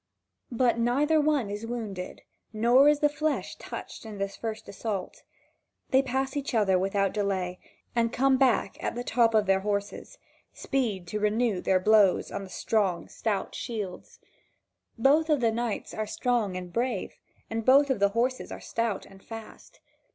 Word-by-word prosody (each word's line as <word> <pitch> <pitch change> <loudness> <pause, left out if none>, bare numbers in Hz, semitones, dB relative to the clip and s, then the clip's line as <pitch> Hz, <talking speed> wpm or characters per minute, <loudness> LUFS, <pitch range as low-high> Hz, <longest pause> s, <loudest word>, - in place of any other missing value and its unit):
But 240 0 +2
neither 290 +7 +3
one 290 -8 +1
is 210 +2 -5
wounded, 215 -6 -5 0.3
nor 240 +6 +5
is 295 -1 +2
the 295 - +6
flesh 300 +1 -2
touched - - -8
in 215 -2 -8
this 195 0 -3
first 220 -1 -5
assault. 200 -2 -5 0.7
They 265 - +5
pass 265 +1 -2
each 280 -3 -2
other 195 -4 +3
without 195 0 0
delay, 190 -3 -1 0.4
and 230 -1 +2
come 265 +2 +3
back 255 -6 +2
at - - -2
the 245 - -3
top 230 -1 +2
of 215 -1 +4
their 195 0 +3
horses: 205 - -3 0.4
speed 225 -10 -2
to 210 - -2
renew 210 -2 +1
their 190 -1 +2
blows 205 -1 +4
on - - -4
the 190 - -10
strong, 190 -5 0
stout 205 -4 -2
shields. 210 -6 -6 0.8
Both 290 +7 +4
of 300 -2 +3
the 230 -2 +2
knights 235 -1 -3
are 215 0 -3
strong 220 -5 0
and 180 -1 -8
brave, 235 -4 -2 0.3
and 225 0 -3
both 275 +3 +5
of 250 - 0
the 200 0 +4
horses 245 +5 -1
are - - -6
stout 230 -3 -2
and 195 0 -16
fast. 225 -1 -11
225 Hz, 165 wpm, -28 LUFS, 200-255 Hz, 0.8 s, the